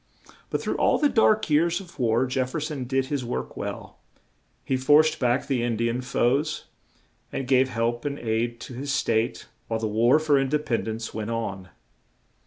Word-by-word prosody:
But - - -2
through - - -1
all - - +3
the 295 - +3
dark 215 -4 +3
years 165 +4 +2
of 180 -6 -13
war 120 +1 +2
Jef 130 0 -1
fer 155 - -3
son 150 -4 -4
did 135 +1 0
his 140 -1 -2
work 65 - -4
well; - - -6 0.7
he 130 - 0
forced 150 +4 +4
back 125 0 +1
the 135 -4 0
In 120 -2 -1
di 115 +1 +1
an 120 +2 -2
foes, 135 +4 0 0.7
and 135 - -4
gave 130 0 +4
help 120 0 -1
and 145 -1 -3
aid 115 0 -1
to - - -8
his 140 +3 -4
State 115 -5 0 0.2
while 115 -1 -1
the 110 - -1
War 115 +6 +4
for 155 -3 +3
In 135 -1 0
de 150 - +2
pend 120 -7 -2
ence 110 +1 -4
went 110 0 -4
on. 100 -5 -4
130 Hz, 195 wpm, -25 LUFS, 115-145 Hz, 0.7 s, forced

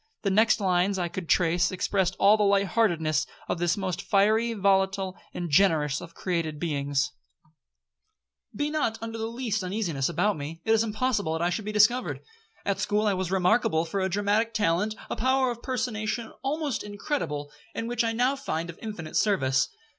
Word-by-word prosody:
The 200 - +1
next 220 +2 +4
lines 185 0 +2
that 185 - -1
I 175 - -2
could 175 -1 -6
trace, 175 0 +3
expressed 190 0 0
all 205 +2 +6
the 215 - -1
light 200 -1 +3
heartedness 165 -7 +1 0.2
of - - -2
this 175 +2 +1
most 185 -3 -2
fiery, 220 +4 +2
volatile, 195 -2 +1 0.2
and 175 - -4
generous 155 -4 +3
of 170 - -11
created 165 -4 -2
beings. 145 -4 -1 1.4
'Be 290 +7 -1
not 290 -8 0
under 225 +1 -6
the 220 - -2
least 230 -3 -2
uneasiness 180 -8 -1
about 180 +4 +1
me, 150 +3 -6
it 220 - +1
is 225 0 +4
impossible 215 -5 0
that 160 +1 -1
I 175 - +1
should 205 +3 -3
be 215 - -3
discovered. 215 +4 +3 0.4
At 200 -1 0
school 210 +1 +1
I 205 - +3
was 185 -2 -2
remarkable 180 -3 +2
for 180 +4 -3
a 190 0 0
dramatic 205 +4 +1
talent, 205 +1 +1
a - - -3
power 260 +1 +2
of 235 0 -7
personation 225 -2 -2
almost 285 -1 -2
incredible, 205 - -3 0.2
and 230 - -3
which 240 0 0
I 230 - +1
now 250 +4 +1
find 170 -11 -3
of 170 - -19
infinite 205 -8 -6
service. 135 -11 +2
200 Hz, 185 wpm, -27 LUFS, 175-225 Hz, 1.4 s, all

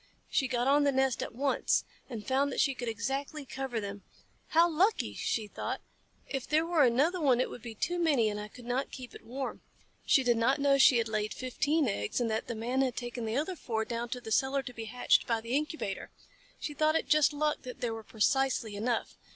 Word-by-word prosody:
She 265 - +2
got 245 0 0
on 290 +1 +5
the 285 - +3
nest 265 -2 +1
at - - -5
once, 275 +2 +1 0.2
and 225 -5 -6
found 275 +2 +1
that - - -3
she 275 - +3
could 245 -2 -6
exactly 270 +6 -3
cover 265 -3 -3
them. 200 -1 -6 0.5
"How 335 +2 +5
lucky!" 360 +7 +1
she 220 - -1
thought. 205 - -4 0.5
"If 270 -3 -4
there 310 +2 +2
were 335 -3 +3
another 285 +9 +3
one 260 -5 +4
it 255 - 0
would 245 - -8
be 230 -1 -8
too 350 +10 -1
many 290 -10 +3
and 210 -1 -2
I 210 - -5
could 240 +3 -14
not 250 +3 -1
keep 250 -3 -9
it - - -12
warm." 260 +3 -5 0.4
She 270 - +4
did 240 -2 +3
not 250 +4 +3
know 280 -1 +4
she 260 -2 +7
had 230 -1 +1
laid 215 -1 -2
fifteen 285 +4 0
eggs, 105 - -1
and 235 -2 0
that 220 - -2
the 235 - -3
Man 245 +4 0
had 260 -2 0
taken 240 -1 -4
the 220 +3 -1
other 320 +6 -1
four 220 -8 -2
down 235 +1 -3
cellar 265 +3 0
to 250 -1 -8
be 225 -1 -6
hatched 245 +3 +2
by 230 -1 +1
the 230 +3 -3
incubator. 295 -9 -2 0.5
She 300 - -4
thought 310 +2 +2
it - - 0
just 305 0 +5
luck 300 +1 0
that 250 -1 -9
there 235 -2 -1
were 225 - -6
precisely 230 0 +1
enough. 225 +3 -2
255 Hz, 225 wpm, -31 LUFS, 230-280 Hz, 0.5 s, she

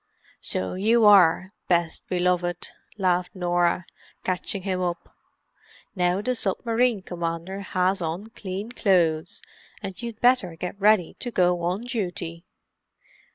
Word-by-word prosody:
"So 95 - -1
you 220 +4 +3
are, 185 -2 +6 0.2
best 170 -2 0
beloved," 180 -1 0 0.3
laughed 180 -2 0
Norah, 175 -1 +1 0.4
catching 185 +1 -2
him 185 -2 -1
up. 175 -1 -4 0.8
"Now 180 +2 +1
the 255 - +1
submarine 230 0 0
commander 170 +2 -4
has 185 0 0
on 175 +7 -4
clean 200 0 -6
clothes, 175 -8 +1 0.4
and 190 +3 -6
you'd 235 -2 -6
better 245 -8 +3
get 180 +4 -6
ready 210 -4 +4
to 245 - -4
go 180 -5 +2
on 180 +4 -1
duty." 180 -8 -4
185 Hz, 120 wpm, -25 LUFS, 175-210 Hz, 0.8 s, are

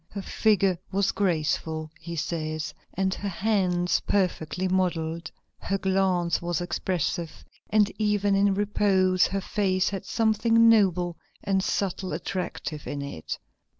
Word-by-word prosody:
"Her 200 -1 -6
figure 195 -5 +2
was 195 0 +2
graceful," 160 -3 -1
he 170 -1 -6
says, 155 -1 -3 0.2
"and 190 0 +1
her 200 - -4
hands 185 -3 +1
perfectly 185 -2 0
modelled. 170 -3 -1 0.3
Her 195 - -1
glance 185 -4 +1
was 175 -2 -1
expressive, 175 -2 -2 0.2
and 210 -1 +3
even 205 -1 +2
in 195 0 +3
repose 190 -3 +3
her 195 0 -2
face 190 -2 +1
had 195 -2 -5
something 230 +1 +3
noble 180 -6 +3 0.3
and 190 -1 +1
subtly 195 -2 -1
attractive 170 -5 -4
in 140 -1 -4
it. 80 - -5
185 Hz, 125 wpm, -26 LUFS, 170-200 Hz, 0.3 s, and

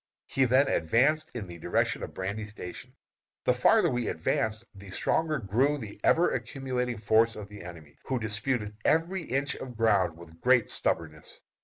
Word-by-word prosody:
He 135 - +1
then 130 +3 +4
advanced 135 - +2
in 115 -5 -4
the 85 -2 -10
direction - - 0
of - - -7
Brandy 100 +3 -4
Station. 100 -4 -9 0.5
The - - +4
farther - - +4
we 120 -1 -1
advanced 110 +7 -1
the 100 0 -12
stronger 155 +10 0
grew 130 +6 +1
the 110 -6 -9
ever 175 +2 +4
accumulating 125 -3 -3
force 110 +1 +3
of 105 -1 -8
the 105 0 -10
enemy, 80 -4 -11
who 130 - -1
disputed 110 0 -2
every 170 +4 +2
inch 140 -1 -1
of 125 -3 -8
ground 100 -7 +2
with 85 -1 -14
great 125 -3 +4
stubbornness. 80 -1 -1
110 Hz, 165 wpm, -28 LUFS, 100-130 Hz, 0.5 s, then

